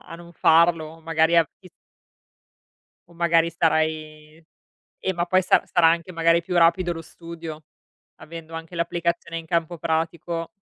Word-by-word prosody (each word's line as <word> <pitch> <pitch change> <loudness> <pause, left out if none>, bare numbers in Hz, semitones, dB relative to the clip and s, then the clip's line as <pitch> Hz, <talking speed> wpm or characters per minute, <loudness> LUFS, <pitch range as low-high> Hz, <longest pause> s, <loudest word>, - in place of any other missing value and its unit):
a - - -12
non 170 0 -13
farlo, 165 -1 +3
magari 160 +1 +2
a 165 - +6 0.2
ti 185 - -15 1.4
O - - -18
magari 170 -1 +3
starai 155 -2 -1 0.6
eh, 190 - -1
ma 170 - 0
poi 185 +1 +2
sa - - +3
sarà 175 -2 +3
anche 170 +2 -1
magari 165 0 +2
più 180 +1 -5
rapido 175 +1 +3
lo 165 - -6
studio, 165 -1 -10 0.5
avendo 165 0 -11
anche 165 +2 -8
l'applicazione 170 0 -2
in 165 - -10
campo 170 0 -1
pratico. 165 +1 -2
165 Hz, 145 wpm, -23 LUFS, 160-170 Hz, 1.4 s, a